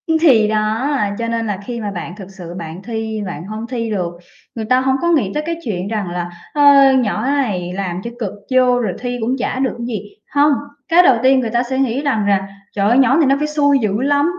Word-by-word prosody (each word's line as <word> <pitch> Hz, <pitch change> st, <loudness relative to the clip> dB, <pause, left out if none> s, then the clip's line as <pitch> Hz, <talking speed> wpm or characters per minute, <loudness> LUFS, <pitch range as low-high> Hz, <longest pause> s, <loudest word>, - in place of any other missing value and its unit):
Ưm, 320 Hz, -1 st, +3 dB
thì 240 Hz, -10 st, +5 dB
đó, 215 Hz, +4 st, 0 dB, 0.3 s
cho 230 Hz, -, -2 dB
nên 230 Hz, -1 st, -2 dB
là 205 Hz, -2 st, -2 dB
khi 240 Hz, -2 st, -5 dB
mà 205 Hz, -1 st, -3 dB
bạn 175 Hz, -2 st, -6 dB
thực 195 Hz, -3 st, -10 dB
sự 180 Hz, -3 st, -9 dB
bạn 165 Hz, +1 st, -7 dB
thi 220 Hz, -1 st, -4 dB
bạn 170 Hz, -2 st, -6 dB
hông 215 Hz, +2 st, -6 dB
thi 230 Hz, -2 st, -3 dB
được, 185 Hz, -5 st, -2 dB, 0.4 s
người 225 Hz, -2 st, -4 dB
ta 255 Hz, +3 st, +3 dB
hổng 265 Hz, 0 st, +1 dB
có 340 Hz, -, 0 dB
nghĩ 250 Hz, -, +2 dB
tới 300 Hz, -, -2 dB
cái 335 Hz, +1 st, -2 dB
chuyện 190 Hz, -5 st, -3 dB
rằng 210 Hz, -4 st, -3 dB
là 175 Hz, 0 st, -3 dB, 0.2 s
"Ơ, 280 Hz, -2 st, +6 dB
nhỏ 230 Hz, -3 st, 0 dB
này 215 Hz, -11 st, -1 dB
làm 185 Hz, -2 st, -3 dB
cho 235 Hz, -, -5 dB
cực 210 Hz, -5 st, -2 dB, 0.2 s
vô 250 Hz, -1 st, +4 dB
rồi 235 Hz, -, -1 dB
thi 245 Hz, 0 st, -3 dB
cũng 240 Hz, +4 st, 0 dB
chả 255 Hz, 0 st, -2 dB
được 265 Hz, -1 st, 0 dB
cái 235 Hz, -, -5 dB
gì." 210 Hz, -3 st, -6 dB, 0.2 s
Hông, 290 Hz, +1 st, +5 dB, 0.4 s
cái 345 Hz, +2 st, +6 dB
đầu 265 Hz, -8 st, +5 dB
tiên 265 Hz, 0 st, +5 dB
người 235 Hz, -3 st, -1 dB
ta 240 Hz, +2 st, +1 dB
sẽ 260 Hz, +1 st, -3 dB
nghĩ 265 Hz, 0 st, 0 dB
rằng 260 Hz, -8 st, 0 dB
rà: 195 Hz, -1 st, +1 dB, 0.3 s
"Trời 200 Hz, 0 st, +2 dB
ơi! 240 Hz, -, +4 dB
Nhỏ 265 Hz, +1 st, +4 dB
này 325 Hz, -, +4 dB
nó 275 Hz, 0 st, +4 dB
phải 300 Hz, +1 st, -1 dB
xui 285 Hz, -2 st, +2 dB
dữ 215 Hz, -1 st, -1 dB
lắm 285 Hz, +1 st, +2 dB
230 Hz, 250 wpm, -18 LUFS, 205-270 Hz, 0.4 s, Ơ